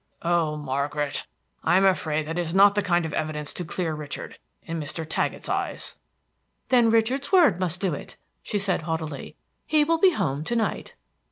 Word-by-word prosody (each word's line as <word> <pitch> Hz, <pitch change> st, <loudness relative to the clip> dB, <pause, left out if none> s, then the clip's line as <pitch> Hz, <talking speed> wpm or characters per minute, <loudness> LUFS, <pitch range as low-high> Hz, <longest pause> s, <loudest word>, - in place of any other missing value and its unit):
"Oh, 165 Hz, -3 st, +1 dB
Margaret, 145 Hz, +1 st, -2 dB, 0.4 s
I 175 Hz, -, +4 dB
am 195 Hz, -, +4 dB
afraid 155 Hz, -5 st, +1 dB
that 165 Hz, +2 st, -4 dB
that -, -, +2 dB
is 170 Hz, +1 st, -3 dB
not 200 Hz, +1 st, +7 dB
the 205 Hz, -, +1 dB
kind 175 Hz, -3 st, +1 dB
of 160 Hz, -, -5 dB
evidence 150 Hz, -1 st, -3 dB
to 180 Hz, -, -4 dB
clear 170 Hz, -1 st, -2 dB
Richard 150 Hz, -1 st, -6 dB, 0.2 s
in 165 Hz, 0 st, -4 dB
Mr. 155 Hz, +1 st, -4 dB
Taggett's -, -, -1 dB
eyes." -, -, -3 dB, 0.7 s
"Then 240 Hz, -3 st, +5 dB
Richard's 230 Hz, +6 st, +1 dB
word 325 Hz, -, +5 dB
must 180 Hz, -1 st, 0 dB
do 190 Hz, -5 st, +1 dB
it," -, -, -7 dB, 0.3 s
she 210 Hz, -, -2 dB
said 195 Hz, -3 st, 0 dB
haughtily. 160 Hz, -2 st, -4 dB, 0.3 s
"He 305 Hz, -1 st, +4 dB
will 330 Hz, +2 st, +1 dB
be 370 Hz, 0 st, +5 dB
home 140 Hz, -, -1 dB
to 240 Hz, -, -1 dB
night." 225 Hz, -2 st, -2 dB
175 Hz, 185 wpm, -25 LUFS, 155-205 Hz, 0.7 s, not